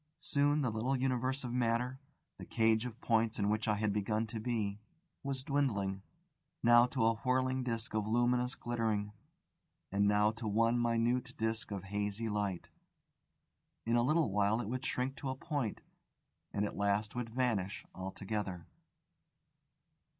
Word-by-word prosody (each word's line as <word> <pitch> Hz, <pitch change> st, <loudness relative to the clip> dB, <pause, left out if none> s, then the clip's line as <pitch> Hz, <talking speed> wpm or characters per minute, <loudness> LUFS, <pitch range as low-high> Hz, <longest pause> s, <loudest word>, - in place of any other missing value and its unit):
Soon 145 Hz, +1 st, +2 dB
the 125 Hz, -, +1 dB
little 115 Hz, +5 st, 0 dB
universe 130 Hz, +1 st, 0 dB
of 120 Hz, -1 st, -4 dB
matter, 125 Hz, +1 st, 0 dB, 0.4 s
the -, -, -7 dB
cage 115 Hz, +1 st, +2 dB
of 120 Hz, -1 st, -10 dB
points 115 Hz, -1 st, +2 dB
in 100 Hz, -1 st, +1 dB
which 110 Hz, +1 st, 0 dB
I 105 Hz, -, +3 dB
had 105 Hz, -1 st, 0 dB
begun 105 Hz, +2 st, 0 dB
to 110 Hz, 0 st, -5 dB
be, 110 Hz, -3 st, -1 dB, 0.4 s
was 135 Hz, -2 st, -3 dB
dwindling, 105 Hz, -10 st, 0 dB, 0.6 s
now 120 Hz, +1 st, +7 dB
to 125 Hz, -3 st, 0 dB
a 115 Hz, -, +5 dB
whirling 130 Hz, +1 st, +1 dB
disc 115 Hz, -1 st, -2 dB
of 105 Hz, -1 st, 0 dB
luminous 120 Hz, +2 st, +2 dB
glittering, 110 Hz, -3 st, -1 dB, 0.8 s
and 100 Hz, +1 st, +3 dB
now 105 Hz, +1 st, +4 dB
to 115 Hz, 0 st, -6 dB
one 115 Hz, +3 st, +3 dB
minute 120 Hz, +2 st, +1 dB
disc 110 Hz, 0 st, -1 dB
of 100 Hz, -3 st, -4 dB
hazy 105 Hz, +2 st, -2 dB
light. 100 Hz, -4 st, -2 dB, 1.2 s
In 115 Hz, +1 st, +2 dB
a 120 Hz, -, +4 dB
little 155 Hz, -1 st, +2 dB
while 105 Hz, +2 st, +2 dB
it 120 Hz, -, -3 dB
would 130 Hz, +3 st, -3 dB
shrink 130 Hz, 0 st, -1 dB
to 135 Hz, -, -4 dB
a 130 Hz, -, -2 dB
point, 140 Hz, -5 st, -3 dB, 0.7 s
and 105 Hz, 0 st, 0 dB
at -, -, -4 dB
last 100 Hz, +1 st, 0 dB
would 120 Hz, -2 st, -3 dB
vanish 110 Hz, -6 st, -1 dB
altogether. 95 Hz, -1 st, -4 dB
115 Hz, 155 wpm, -34 LUFS, 105-125 Hz, 1.2 s, now